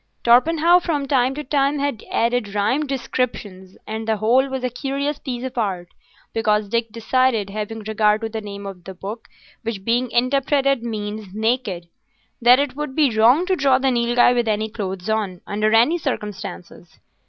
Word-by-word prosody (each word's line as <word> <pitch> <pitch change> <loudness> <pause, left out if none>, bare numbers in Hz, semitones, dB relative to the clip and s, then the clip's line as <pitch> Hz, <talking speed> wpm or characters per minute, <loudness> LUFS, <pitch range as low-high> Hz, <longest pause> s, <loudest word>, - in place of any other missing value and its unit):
Torpenhow 325 +8 +5
from 300 -5 -2
time 260 -1 +2
to 300 - -5
time 280 +1 +1
had 280 -5 -2
added 230 -3 0
rhymed 255 +9 0
descriptions, 210 -8 -4
and 220 +1 -5
the 220 -1 +1
whole 245 +6 +3
was 265 -1 -4
a 250 - 0
curious 280 +3 -3
piece 250 -2 -5
of 260 - -5
art, 185 -5 -2 0.4
because 210 -2 +1
Dick 230 0 -1
decided, 230 -2 +1
having 215 +2 -5
regard 215 0 +1
to 225 - -3
the 220 0 -5
name 200 -1 -8
of 190 -3 -9
the 190 - -8
book 205 +5 -7 0.3
which 220 -4 -5
being 240 +2 +1
interpreted 275 +2 +1
means 210 -3 -5
"naked," 215 -6 -1 0.5
that 245 +2 +7
it 280 -2 -1
would 295 -2 -5
be 285 -7 +2
wrong 245 +10 +5
to 375 0 +1
draw 270 -4 +3
the 265 0 +1
Nilghai 240 0 +3
with 240 -1 0
any 215 0 0
clothes 190 -3 -5
on, 210 -5 -1
under 215 +1 0
any 240 +10 +4
circumstances. 210 - -6
235 Hz, 175 wpm, -21 LUFS, 210-265 Hz, 0.5 s, that